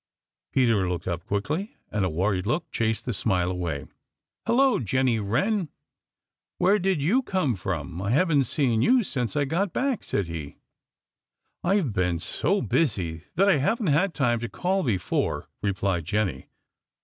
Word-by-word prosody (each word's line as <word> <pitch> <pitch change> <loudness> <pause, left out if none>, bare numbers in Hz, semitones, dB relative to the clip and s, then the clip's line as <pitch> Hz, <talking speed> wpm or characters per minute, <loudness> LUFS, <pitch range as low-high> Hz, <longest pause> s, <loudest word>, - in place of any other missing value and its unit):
Peter 115 -8 +2
looked 90 -1 -3
up 85 -2 -2
quickly, 150 - -2
and 105 -2 0
a 95 - +1
worried 90 +3 0
look 155 +7 -1
chased 110 -1 -1
the 125 - -1
smile 90 -3 +1
away. 85 -6 -3 0.6
"Hello, 260 +3 +4
Jenny 125 +1 +1
Wren! 150 - 0 0.9
Where 200 +3 +4
did 190 -3 +1
you 225 - +3
come 185 - 0
from? 85 -3 -4
I 100 - -2
haven't 145 +1 +3
seen 120 -4 +1
you 250 - +4
since 125 - -2
I 145 -1 +2
got 170 +6 -1
back," 265 -3 0
said 100 - -1
he. 80 -4 -7 1.1
"I've 180 - +1
been 90 -3 +1
so 190 - 0
busy 90 - 0
that 195 +4 +4
I 190 -6 +5
haven't 165 - +1
had 180 +4 +2
time 120 -5 +2
to 120 0 -4
call 190 +2 0
before," 105 - -1
replied 95 -4 -1
Jenny. 95 -7 -1
120 Hz, 155 wpm, -26 LUFS, -, 1.1 s, I